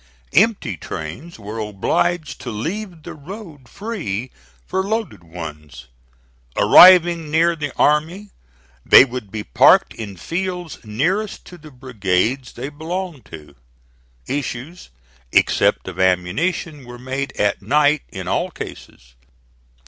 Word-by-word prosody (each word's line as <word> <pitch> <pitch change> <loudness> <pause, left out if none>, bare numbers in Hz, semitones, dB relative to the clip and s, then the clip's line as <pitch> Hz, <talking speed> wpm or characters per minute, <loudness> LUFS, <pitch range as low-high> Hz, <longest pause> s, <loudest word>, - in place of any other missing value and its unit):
Empty 190 - +2
trains 85 - -7
were 105 +1 -7
obliged 145 - -1
to 125 - -6
leave 170 - -5
the - - -8
road 155 - -11
free 160 - -5 0.3
for 190 - -1
loaded 220 - -3
ones. 75 -5 -9 0.7
Arriving 175 -3 +7
near 165 +2 +3
the 150 -3 -4
army 165 +7 +1 0.5
they 130 - +8
would 125 -5 -7
be 110 -2 -4
parked - - +4
in 100 -4 -8
fields 180 - -4
nearest 175 - -2
to 180 - -12
the 155 -3 -13
brigades 125 -1 -1
they 130 +4 -6
belonged 160 0 -5
to. 75 -2 -12 0.7
Issues, 140 +4 -5 0.4
except - - +2
of - - -7
ammunition, 135 - 0
were 120 0 -10
made 135 +2 -4
at 105 -1 +1
night 145 +7 +3
in - - -7
all - - 0
cases. - - -10
145 Hz, 120 wpm, -20 LUFS, 105-175 Hz, 0.7 s, they